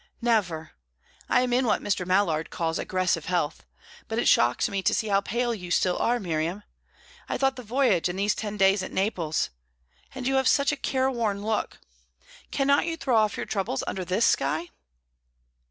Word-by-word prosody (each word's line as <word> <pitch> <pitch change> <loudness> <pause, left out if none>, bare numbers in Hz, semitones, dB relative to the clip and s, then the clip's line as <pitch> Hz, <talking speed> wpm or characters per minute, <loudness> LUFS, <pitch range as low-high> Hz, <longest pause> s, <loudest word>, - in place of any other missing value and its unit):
"Never. 190 -10 0 0.6
I 250 - +4
am 250 -1 0
in 250 0 +2
what 210 - +1
Mr. 180 -3 -1
Mallard 180 -4 +1
calls 165 -1 -2
aggressive 185 -4 0
health. 170 -3 -1 0.4
But 225 - -3
it 240 - +1
shocks 120 +1 +4
me 195 -1 -2
to - - +2
see 220 - -1
how 200 0 +3
pale 235 +4 -1
you 180 -5 -7
still 180 +1 +2
are 240 +1 +1
Miriam. 170 +2 -2 0.7
I - - -1
thought 270 -1 +1
the 250 - -7
voyage 230 -7 +1
and 180 - -4
these 205 +2 +2
ten 210 -1 -5
days 195 0 +4
at 185 - -6
Naples 175 - -1 0.6
And 255 - -5
you 270 +1 +2
have 265 -1 +2
such 280 0 +3
a - - -1
careworn 240 -7 -1
look. 220 -1 -1 0.7
Cannot 280 +3 +2
you 330 -1 -2
throw 270 -6 0
off 215 -2 +2
your - - -3
troubles 195 -9 -2
under 190 - -3
this 185 +6 +1
sky?" 155 +5 +1
205 Hz, 185 wpm, -26 LUFS, 180-245 Hz, 0.7 s, I